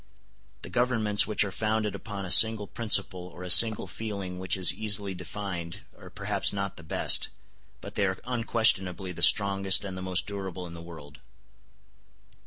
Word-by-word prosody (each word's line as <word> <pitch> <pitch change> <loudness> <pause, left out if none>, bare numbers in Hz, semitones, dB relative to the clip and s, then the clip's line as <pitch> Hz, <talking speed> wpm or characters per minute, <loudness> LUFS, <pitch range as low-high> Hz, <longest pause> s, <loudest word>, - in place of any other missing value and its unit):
The - - -8
governments 110 -4 +1
which 105 - 0
are 100 - -6
founded 110 +1 -3
upon 100 -3 -8
a 90 - -4
single 110 -1 +6
principle 100 -5 +1
or 90 0 -12
a 90 - -1
single 110 0 +6
feeling 100 -5 -7
which 95 +1 -2
is 90 -2 +3
easily 105 -2 -2
defined 90 -2 -8
are - - -14
perhaps - - -3
not 100 -1 -5
the - - -12
best, 80 - +1 0.5
but - - -10
they 100 - 0
are 95 0 -4
unquestionably 110 -6 0
the 90 - -10
strongest 100 -1 +4
and 95 -1 -7
the 95 - -8
most 95 -1 -2
durable 95 -3 -7
in 85 - -11
the 85 - -10
world. 75 -3 -13
100 Hz, 170 wpm, -26 LUFS, 90-105 Hz, 0.5 s, single